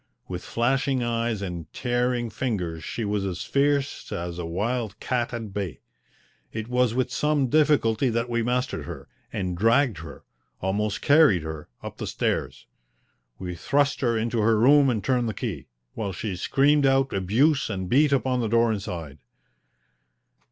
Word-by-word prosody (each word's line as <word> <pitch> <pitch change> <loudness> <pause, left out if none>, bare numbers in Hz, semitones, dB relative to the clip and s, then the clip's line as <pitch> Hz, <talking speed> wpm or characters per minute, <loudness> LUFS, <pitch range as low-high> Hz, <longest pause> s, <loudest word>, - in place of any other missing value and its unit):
With 90 0 -5
flashing 130 +2 0
eyes 115 -3 -1
and 85 -4 -6
tearing 120 -1 0
fingers 90 - -3
she 115 - -4
was 100 -1 -1
as 95 -2 -3
fierce 140 0 0
as 85 0 -4
a 85 - -4
wild 110 +4 -2
cat 120 -2 -1
at 115 -4 -6
bay. 100 -5 -4 0.7
It 110 0 -5
was 125 -1 +1
with 125 -1 0
some 145 +1 +1
difficulty 140 -5 +3
that 115 +1 -1
we 120 -1 0
mastered 125 +2 -1
her, - - -8 0.2
and 90 -2 -2
dragged 115 - +3
her 80 - -10 0.4
almost 105 +2 -1
carried 145 - +5
her 80 -1 -7
up - - -7
the - - -5
stairs. - - -2 0.7
We 90 -1 -5
thrust 140 - +1
her 120 -3 +2
into 115 +1 -1
her 110 +1 +3
room 140 +3 +6
and 110 -5 -1
turned 125 -3 +1
the 110 - -5
key, - - -4 0.3
while 100 -3 -3
she 95 +1 -4
screamed 140 +9 +3
out 135 0 +2
abuse 125 - +2
and 95 -3 -3
beat 140 +7 +4
upon 130 -2 +1
the 115 - -1
door 115 0 +3
inside. 85 -8 -6
115 Hz, 160 wpm, -25 LUFS, 95-130 Hz, 0.7 s, room